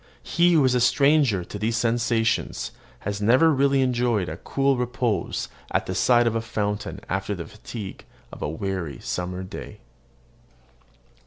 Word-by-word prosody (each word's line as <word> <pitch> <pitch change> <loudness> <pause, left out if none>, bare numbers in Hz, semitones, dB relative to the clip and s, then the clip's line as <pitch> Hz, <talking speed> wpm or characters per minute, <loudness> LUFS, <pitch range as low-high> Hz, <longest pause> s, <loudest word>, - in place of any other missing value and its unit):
He 175 0 +3
who 150 -5 +5
is 130 - +3
a 125 - +3
stranger 140 - +4
to 105 - -8
these 115 +2 0
sensations 115 -1 0 0.3
has 105 0 -3
never 130 +10 +5
really 140 0 +3
enjoyed 120 -9 0
cool 135 0 +1
repose 125 -3 -1 0.2
at - - 0
the - - -3
side 120 -1 +4
of 115 - +2
a 115 - 0
fountain 105 -2 -3
after - - -2
the - - -6
fatigue 95 - -8 0.3
of - - -10
a - - -1
weary 85 -1 -3
summer 90 +1 -3
day. 95 - -8
115 Hz, 150 wpm, -24 LUFS, 100-130 Hz, 0.3 s, who